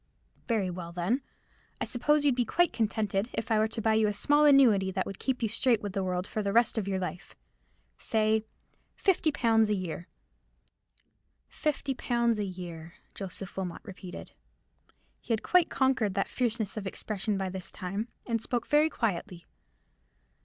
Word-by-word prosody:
"Very 210 -6 +1
well, 170 -1 -6
then. 180 +10 0 0.6
I - - -1
suppose 295 +4 +2
you'd 280 - +5
be 245 0 +1
quite 350 +9 +2
contented 215 -1 0
if 225 - -3
I 220 - +4
were 215 - +3
to 225 0 -5
buy 220 - +3
you 220 -1 +3
a 210 - 0
small 290 +8 +3
annuity, 245 -10 +6
that 190 0 -1
would 195 - -7
keep 260 -2 -1
you - - +3
straight 230 +1 +2
with 200 -2 -4
the 195 - -1
world 180 0 -1
for 215 - -3
the 200 -1 -1
rest 230 +1 +3
of 200 - -4
your 195 -1 0
life. 180 0 -5 0.6
Say, 220 -1 +1 0.5
fifty 360 -5 +2
pounds 225 -5 +3
a 210 - +2
year." 180 -2 -5 1.4
"Fifty 285 -2 -2
pounds 235 -3 +1
a 205 - 0
year," 175 -3 -8 0.2
Joseph 195 -1 -6
Wilmot 180 -3 -4
repeated. 190 -4 -9 0.9
He 235 - -2
had 220 - -1
quite 360 -2 +4
conquered 250 -7 +1
that 195 - 0
fierceness 225 -4 -1
of 200 -2 -3
expression 205 +1 -2
by 190 -1 -2
this 185 0 -4
time, 195 +5 -4 0.2
and 230 -2 -1
spoke 240 0 -2
very 300 +2 +4
quietly. 200 - -3
215 Hz, 175 wpm, -29 LUFS, 190-240 Hz, 1.4 s, annuity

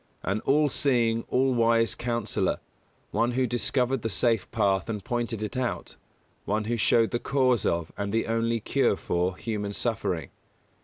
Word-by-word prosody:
An 100 +3 -1
all 150 +2 +4
seeing, 120 -5 +1
all 130 +1 +2
wise 115 -2 +3
Counsellor; 120 -2 -1 0.5
one 120 +1 +1
who 130 +1 +2
discovered 125 +1 0
the 115 - -2
safe 115 0 +1
path 100 -3 +1
and 105 -3 -3
pointed 120 0 -2
it 105 - -5
out; 125 -1 -3 0.5
one 105 +1 0
who 115 +3 -1
showed 115 0 +3
the 120 - 0
cause 130 -5 +2
of, 85 -1 -1
and 100 0 -2
the 115 +1 +1
only 115 +1 0
cure - - +1
for, 90 +2 -1
human 105 -2 -3
suffering. 100 - -2
115 Hz, 160 wpm, -27 LUFS, 105-120 Hz, 0.5 s, all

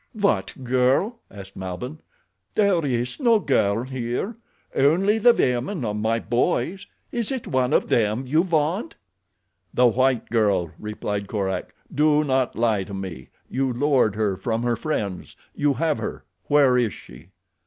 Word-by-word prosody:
"What 130 - 0
girl?" 130 - +2
asked 100 -1 -11
Malbihn. 95 - -6 0.6
"There 200 -5 +3
is 125 - -2
no 235 -5 +4
girl 115 - +1
here—only 150 - -1
the 240 +3 +7
women 130 - 0
of 105 -1 -2
my 110 +2 0
boys. 170 +10 -1 0.2
Is 235 -1 -2
it 260 -3 -3
one 130 -1 0
of - - +2
them 110 +2 +1
you 155 +6 +3
want?" 165 +2 0 0.8
"The 125 - +3
white 130 0 +2
girl," 100 -7 +2
replied 105 -1 -4
Korak. 95 -3 -3 0.2
"Do 150 +1 +3
not 130 -3 0
lie 110 -3 +1
to 100 - -7
me—you 95 - -4
lured 125 -4 +2
her 105 -3 0
from 115 +2 -2
her 120 -1 +1
friends. 105 - -4 0.2
You 145 -2 +1
have 160 -1 0
her. - - -5 0.2
Where 140 -4 +4
is 115 -5 0
she?" 70 +8 -14
125 Hz, 145 wpm, -23 LUFS, 105-155 Hz, 0.8 s, the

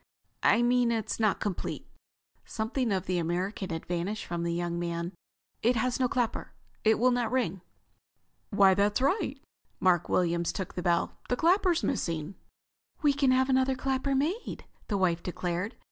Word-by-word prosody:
"I 235 - +4
mean 245 -1 +3
it 225 -3 -2
is - - -3
not 215 -3 +2
complete." 205 -4 -3 0.6
Something 225 +2 -2
of 190 -3 0
the 180 -1 0
American 180 +4 -2
had 165 -2 -4
vanished 180 +5 -3
from 170 -1 -3
the 170 0 -1
young 170 0 -2
man. 170 0 -3 0.5
"It 240 +3 +3
has 245 +3 0
no 255 -1 +2
clapper. 245 -3 -2 0.3
It 220 0 +4
will 250 +3 +4
not 240 -2 0
ring." 205 -8 0 0.9
"Why, 195 -2 +5
that's 205 +3 +2
right." 280 - 0 0.4
Mark 175 -3 +2
Williams 170 -1 +1
took 190 0 -5
the 180 - -4
bell. 170 -1 0
"The 250 - +2
clapper's 355 +1 +3
missing." 165 +1 -2 0.7
"We 290 -1 +5
can 275 -1 +2
have 260 0 +4
another 260 0 +2
clapper 270 +1 -1
made," 325 - -2 0.2
his 205 - +1
wife 175 -3 +1
declared. 180 +4 -3
215 Hz, 165 wpm, -29 LUFS, 175-255 Hz, 0.9 s, Why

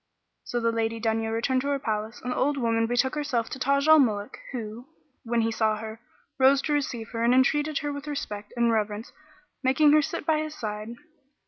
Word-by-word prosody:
So 240 - -2
the 230 0 +1
Lady 225 0 -1
Dunya 225 0 0
returned 255 +3 +1
to 280 - -4
her 285 0 +1
palace, 220 -2 -3
and 250 - -3
the - - -2
old 285 +2 +1
woman 230 -2 +1
betook 245 +2 +1
herself 285 -6 -1
to 265 - -5
Taj 280 +3 +2
al 315 0 +8
Muluk 210 -6 0
who, 235 0 -6 0.4
when 235 0 0
he 225 0 0
saw 220 -1 +1
her, 220 +1 -7 0.4
rose 270 +1 +6
to 300 - 0
receive 245 -6 -2
her 230 -1 -3
and 240 +2 +4
entreated 295 +3 +2
her 290 - -1
with 285 +1 -7
respect 210 -8 -5
and 235 0 +3
reverence 215 0 -2 0.5
making 285 +3 +4
her 305 +1 +6
sit 295 - -4
by 310 0 +2
his 310 0 -4
side. 215 0 -5
240 Hz, 210 wpm, -26 LUFS, 225-280 Hz, 0.5 s, al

